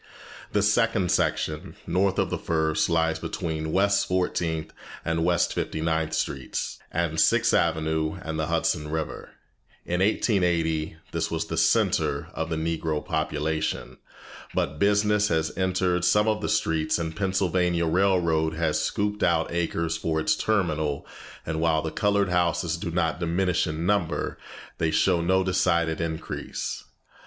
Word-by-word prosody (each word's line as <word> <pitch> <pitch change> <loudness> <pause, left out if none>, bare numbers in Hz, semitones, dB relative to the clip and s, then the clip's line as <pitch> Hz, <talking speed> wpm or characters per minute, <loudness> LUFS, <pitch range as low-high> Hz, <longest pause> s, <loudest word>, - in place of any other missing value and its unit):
The 105 - +2
second 105 -3 +2
section, 75 0 -1
north 95 +1 +1
of - - 0
the - - 0
first, 80 -1 +1
lies 80 -1 +1
between 80 -1 -3
West 100 +2 +2
Fourteenth 85 -3 -1 0.3
and 80 0 0
West 85 -1 +2
Fifty - - -3
ninth 80 -1 0
Streets, 70 -4 -3
and 80 -2 -1
Sixth - - +3
Avenue 80 0 +1
and 80 -1 -4
the 80 - -1
Hudson 75 0 0
River. 80 0 -4 0.6
In 90 +1 -1
1880 85 -7 +1 0.2
this - - -1
was - - -2
the - - -4
centre - - +2
of 80 0 -3
the 80 - -1
Negro 80 -1 -2
population, 80 -1 -2 0.6
but 75 +2 -1
business 105 +1 +3
has 80 -3 0
entered 90 -1 +1
some 105 +5 +4
of 110 -1 +1
the - - -2
streets, 80 -7 +1
the 85 -2 -2
Pennsylvania 90 -1 +1
Railroad 85 -3 +2
has 80 -2 0
scooped 105 0 -1
out 80 -1 +2
acres 85 -1 -1
for 80 -1 -1
its 80 - +2
terminal, 80 -9 0 0.4
and 80 0 -2
while 80 -1 +2
the 80 - -3
colored 100 -2 +1
houses 85 -1 +1
do 85 0 -4
not 85 0 0
diminish 90 +1 +1
in 80 +1 -3
number, 90 -6 0 0.4
they 80 - +2
show 85 +2 +2
no 95 +2 +2
decided 85 -3 +1
increase. 80 -1 -4
85 Hz, 145 wpm, -26 LUFS, 80-95 Hz, 0.6 s, some